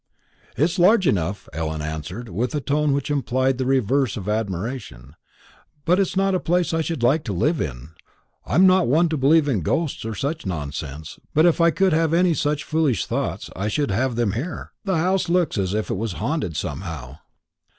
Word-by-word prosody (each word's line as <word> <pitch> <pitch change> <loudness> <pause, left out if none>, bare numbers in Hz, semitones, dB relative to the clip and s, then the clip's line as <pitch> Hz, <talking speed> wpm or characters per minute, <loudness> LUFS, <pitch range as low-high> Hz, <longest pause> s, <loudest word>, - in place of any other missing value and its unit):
"It's 165 +6 +1
large 190 +3 +5
enough," 100 - 0
Ellen 80 0 -3
answered, 80 +10 -5
with 120 - -2
a - - +1
tone 145 +1 +1
which 140 +1 -1
implied 130 -2 0
the 130 - -1
reverse 130 -1 +1
of 100 -2 -6
admiration; 105 - -4 0.7
"but 180 +3 +3
it's 195 -2 0
not 195 0 +2
a 185 - +2
place 175 0 0
I 165 - +1
should 160 -5 -3
like 150 +6 +3
to 105 - -2
live 150 - +1
in. 65 -2 -5 0.5
I'm 185 - +3
not 185 -1 +5
one 160 +7 +3
to 160 - -1
believe 145 +3 +4
in 115 -10 +1
ghosts 155 - -1
or 110 -1 -4
such 145 +6 -3
nonsense, 75 -3 -5 0.2
but 155 +2 +5
if 170 -1 +3
I 170 - +6
could 190 +1 +2
have 165 0 +2
any 175 0 +3
such 150 -1 -1
foolish 155 - 0
thoughts, - - -3
I 95 +4 -2
should 140 +4 0
have 120 +5 0
them 115 -3 +1
here. 130 - -5
The 190 -3 +1
house 185 +2 +1
looks 175 - +1
as 95 +1 -1
if 110 -1 -2
it - - -1
was 110 -1 -3
haunted, 110 - -2
somehow." 75 -5 -5
130 Hz, 195 wpm, -22 LUFS, -, 0.7 s, I